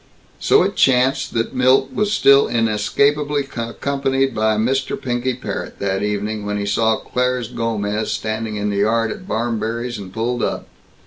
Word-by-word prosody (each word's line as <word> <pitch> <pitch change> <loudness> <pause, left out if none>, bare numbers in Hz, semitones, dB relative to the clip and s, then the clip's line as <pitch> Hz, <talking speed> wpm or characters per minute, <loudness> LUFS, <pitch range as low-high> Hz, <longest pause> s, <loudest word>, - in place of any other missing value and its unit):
So - - +4
it - - -1
chanced 130 0 +2
that 115 +3 -1
Milt 130 +1 +3
was 210 0 0
still 140 -8 +5
inescapably 140 +6 +1
accompanied 135 +3 -1
by 110 0 +1
Mr. 130 +5 0
Pinky 125 0 -2
Parrott, 125 - -6
that 95 -1 -1
evening, 105 +1 -2
when 105 0 -2
he 100 - -2
saw 110 +2 +2
Claire's 125 -1 -2
Gomez 110 -3 -2
standing 110 0 -3
in 105 0 -1
the 100 - -2
yard 115 +2 +1
at 185 - -8
Barmberry's 115 - -2
and 95 -2 -9
pulled 120 +4 -2
up. - - -2
115 Hz, 155 wpm, -20 LUFS, 110-130 Hz, -, still